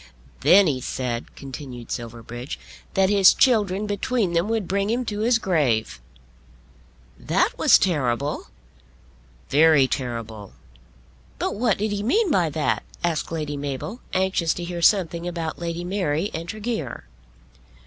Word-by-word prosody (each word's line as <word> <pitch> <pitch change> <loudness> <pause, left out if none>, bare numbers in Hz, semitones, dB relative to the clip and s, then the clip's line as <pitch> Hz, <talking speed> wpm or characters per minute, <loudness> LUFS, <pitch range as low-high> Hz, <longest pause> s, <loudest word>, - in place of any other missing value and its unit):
"Then 195 +2 +6
he 135 -6 0
said," 125 -2 -4
continued 130 -3 -9
Silverbridge, 120 +2 -6 0.4
"that 190 0 +3
his 195 -2 +6
children 210 -6 +3
between 205 -1 -1
them 170 +5 +1
would 225 -5 -1
bring 200 +2 0
him 245 +2 0
to 210 -2 -4
his 230 +2 +3
grave." 135 - 0 1.2
"That - - +1
was - - +6
terrible." 140 -5 -1 1.0
"Very 150 -2 +5
terrible." 115 -6 -5 0.8
"But - - -2
what 220 -1 +1
did 210 +1 -1
he 205 0 -2
mean 355 - +2
by 175 - +2
that?" 155 0 0 0.2
asked 165 -2 -1
Lady 150 -3 -3
Mabel, 145 - -5
anxious 185 -3 +1
to 175 - -5
hear 175 0 -5
something 170 -2 +2
about 165 -3 -4
Lady 170 0 -4
Mary 180 -1 -1
and 165 +1 -5
Tregear. 215 - -4
170 Hz, 135 wpm, -23 LUFS, 140-205 Hz, 1.2 s, Then